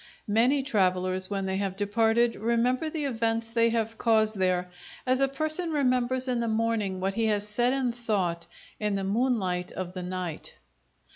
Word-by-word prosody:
Many 255 +5 +3
travellers, 185 -6 +1
when 195 -1 -2
they 190 0 -1
have 195 -1 -2
departed, 225 +3 +2
remember 235 +6 +1
the 310 -2 -3
events 230 -2 -1
they 230 0 +3
have 225 -1 -2
caused 220 -2 +3
there 180 -1 0 0.3
as 255 0 +2
a 275 - +4
person 310 +5 -2
remembers 255 -2 +1
in 250 -2 0
the 235 - -1
morning 220 -4 0
what 190 +1 -1
he 225 +1 +1
has 210 -1 0
said 240 +4 +1
and 260 -3 0
thought 185 -8 -1 0.3
in 210 -1 0
the 195 - -2
moonlight 195 -4 0
of 185 -1 -5
the 185 - -5
night. 180 -2 -5
225 Hz, 170 wpm, -27 LUFS, 190-245 Hz, 0.3 s, a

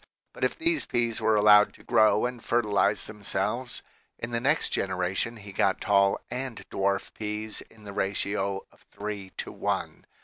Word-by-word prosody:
But - - -7
if - - +1
these 330 -1 +1
peas 115 -2 0
were 110 - +3
allowed 105 0 +6
to - - -17
grow 110 +1 +4
and 125 -2 -4
fertilize 105 -4 +2
themselves, 105 +4 -2 0.3
in 115 - -5
the 115 - 0
next 145 +6 +2
generation 95 +5 -1
he 100 -1 -10
got 95 0 +1
tall 100 -1 +3
and 125 -2 -4
dwarf 100 0 0
peas 105 0 -3
in 110 -1 -18
the 100 -1 -8
ratio 100 0 -1
of - - -25
three 100 -2 -6
to - - -4
one. - - -3
105 Hz, 165 wpm, -27 LUFS, 100-115 Hz, 0.3 s, allowed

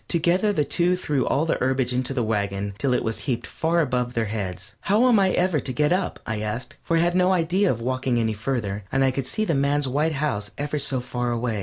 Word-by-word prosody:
Together 175 +5 +2
the 155 -7 +1
two 175 +4 +2
threw 150 -7 -1
all 145 +4 +1
the 165 - 0
herbage 130 -1 +1
into 125 +1 0
the 130 -3 0
wagon 100 -2 -2
till 135 - +1
it 125 - +1
was 110 -1 -2
heaped 120 -1 -1
far 170 +1 0
above 125 -4 -1
their 115 -1 +1
heads. 95 -4 -5
"How 215 +6 +3
am 235 -4 +5
I 190 -1 +4
ever 180 -4 +2
to 135 - -4
get 150 +5 +2
up?" 185 +1 -1
I 110 -1 -3
asked, 110 +3 -4
for 165 - 0
I - - +3
had 175 +1 +2
no 180 +1 +3
idea 180 +3 +2
of 115 - -1
walking 130 0 0
any 110 -1 +1
farther, 105 -3 -3
and 135 0 +2
I 135 - +3
could 130 0 -3
see 215 +10 -1
the 170 - 0
man's 140 0 +1
white 150 +5 +1
house 125 -9 -2
ever 145 +1 -2
so 130 -2 0
far 125 0 -3
away. 120 -2 -1
130 Hz, 250 wpm, -24 LUFS, 115-165 Hz, -, am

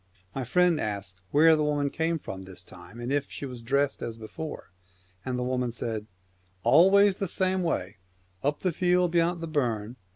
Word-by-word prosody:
'" 90 -1 -33
My 135 - -2
friend 175 +6 +3
asked 100 -3 -4
where 160 +2 +6
the 155 - 0
woman 145 -1 0
came 165 +1 0
from 95 -10 -7
this 95 -1 -9
time, 120 - -13
and 120 +2 -4
if 145 0 0
she - - -6
was 125 -3 -7
dressed 140 +4 0
as 115 -1 -5
before, 130 - -7 0.5
and 130 -1 -2
the 125 - -1
woman 125 -1 -1
said, 110 -2 -4 0.3
' 90 0 -38
Always 190 - +6
the 195 - -2
same 185 +1 +1
way, 105 - -2 0.4
up 145 +2 -1
the 185 - +1
field 180 +1 +2
beyant 170 0 +1
the 165 - -4
burn. 120 -6 -1
140 Hz, 195 wpm, -27 LUFS, 115-165 Hz, 0.5 s, where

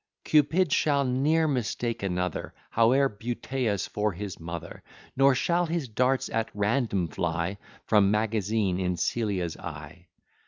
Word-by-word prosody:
Cupid 155 +2 +3
shall 140 -2 +2
ne'er 150 +6 +2
mistake 120 -3 -2
another, 90 -3 -2 0.2
However 125 +5 +4
beauteous, 115 -1 -2
for 105 -1 -1
his 95 +1 -6
mother; 85 0 -7 0.3
Nor 135 0 +5
shall 175 +6 +1
his 160 -4 -2
darts 125 +4 +1
at 115 0 -1
random 105 -3 +1
fly 85 +5 -2 0.3
From 105 -3 +4
magazine 105 -2 0
in 90 -1 -1
Celia's 95 -4 -1
eye. 80 +2 -9
110 Hz, 125 wpm, -27 LUFS, 90-135 Hz, 0.3 s, Nor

